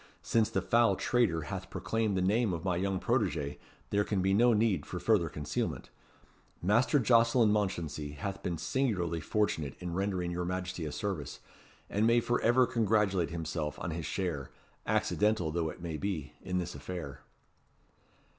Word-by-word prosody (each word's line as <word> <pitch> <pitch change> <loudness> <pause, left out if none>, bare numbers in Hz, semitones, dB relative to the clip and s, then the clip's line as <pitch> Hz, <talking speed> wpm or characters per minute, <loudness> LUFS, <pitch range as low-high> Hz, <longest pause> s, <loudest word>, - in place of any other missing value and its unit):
"Since 115 -2 +2
the - - -1
foul 120 0 +4
traitor 105 -11 +1
hath - - -6
proclaimed 110 -3 -1
the 90 - +1
name 105 +1 +2
of 85 +1 -5
my 90 -2 +1
young 95 +1 0
protegé, 90 - 0 0.3
there 100 0 +3
can 105 -2 -1
be 95 +1 +2
no 120 +4 +5
need 105 -8 +2
for 90 - -6
further 100 -7 +2
concealment. 70 -4 -3 0.7
Master 115 - +3
Jocelyn 115 -2 +4
Mounchensey 85 -8 -1
hath 95 +6 -5
been 85 -2 -2
singularly 90 - 0
fortunate 80 -7 -1
in 90 -1 -5
rendering 95 -2 -1
your 90 0 -2
Majesty 90 -1 -3
a - - -4
service, 75 -1 -4 0.5
and 105 +2 +1
may 115 +1 +5
for 120 +1 0
ever 125 +2 +5
congratulate 105 -6 +1
himself 80 -2 -3
on 85 - -4
his 80 0 -4
share 85 -9 -2 0.4
accidental 105 -6 +1
though 80 -1 -1
it 85 - -9 0.2
be 95 -8 -3
in 90 0 -2
this 90 -3 -2
affair." 70 0 -7
95 Hz, 160 wpm, -31 LUFS, 85-110 Hz, 0.7 s, no